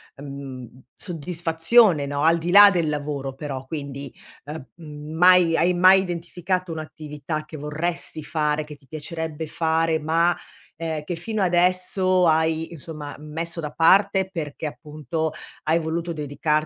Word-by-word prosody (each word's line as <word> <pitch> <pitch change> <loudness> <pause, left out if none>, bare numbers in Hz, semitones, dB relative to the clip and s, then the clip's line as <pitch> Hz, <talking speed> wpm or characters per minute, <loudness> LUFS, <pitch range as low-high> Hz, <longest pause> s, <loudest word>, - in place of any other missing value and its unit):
uhm, 140 - -10
mhmm, 130 -3 -9
soddisfazione, 170 +1 +2
no, 140 0 -3
al 165 +1 +5
di 170 +1 -4
là 205 +2 +9
del 170 -4 0
lavoro 145 -2 -3
però, 135 -2 -6
quindi, 140 -2 -6 0.3
uhm, 150 -1 -7
mhmm, 150 -2 -9
mai 180 -1 +6
hai 175 +2 +3
mai 185 +2 +6
identificato 180 0 -3
un'attività 155 -1 -6
che 155 0 -10
vorresti 155 +2 -3
fare, 150 -1 -1
che 150 -1 -11
ti 135 - -26
piacerebbe 160 +1 -5
fare 160 0 +1
ma, 165 +3 +2 0.4
ehm, 160 -2 -3
che 175 +3 -4
fino 210 +4 -2
adesso 185 +1 +2
hai 160 0 +1
insomma 155 -2 -8
messo 165 +3 -4
da 150 -2 -4
parte, 190 +4 +4
perché 155 -4 -5
appunto 155 +1 -4 0.3
hai 160 +2 +2
voluto 165 +1 -3
dedicarti 150 0 -3
160 Hz, 145 wpm, -23 LUFS, 150-175 Hz, 0.4 s, là